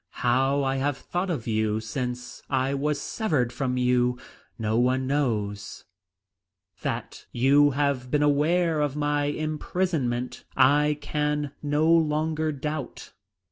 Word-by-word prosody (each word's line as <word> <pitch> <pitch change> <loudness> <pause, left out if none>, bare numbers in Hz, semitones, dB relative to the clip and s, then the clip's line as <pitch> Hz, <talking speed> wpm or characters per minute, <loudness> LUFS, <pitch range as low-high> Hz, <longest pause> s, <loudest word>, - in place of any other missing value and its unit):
How 135 +3 +3
I 135 0 0
have 135 0 0
thought 180 +2 -3
of 150 -10 -2
you 110 -1 0
since 125 +3 -5
I 135 0 +1
was 145 +1 0
severed 140 - -1
from 125 -2 -1
you 125 0 +2 0.4
no 110 0 0
one 130 +2 +2
knows. 105 -8 -2 1.0
That - - -5
you 140 +4 +4
have 140 -3 0
been 150 +2 +2
aware 155 +3 +2
of 145 -2 -1
my 145 -1 0
imprisonment 150 -4 -2
I 145 +3 +4
can 150 -1 -1
no 150 +2 +1
longer 155 -1 +2
doubt. 150 0 -5
140 Hz, 125 wpm, -26 LUFS, 125-150 Hz, 1.0 s, you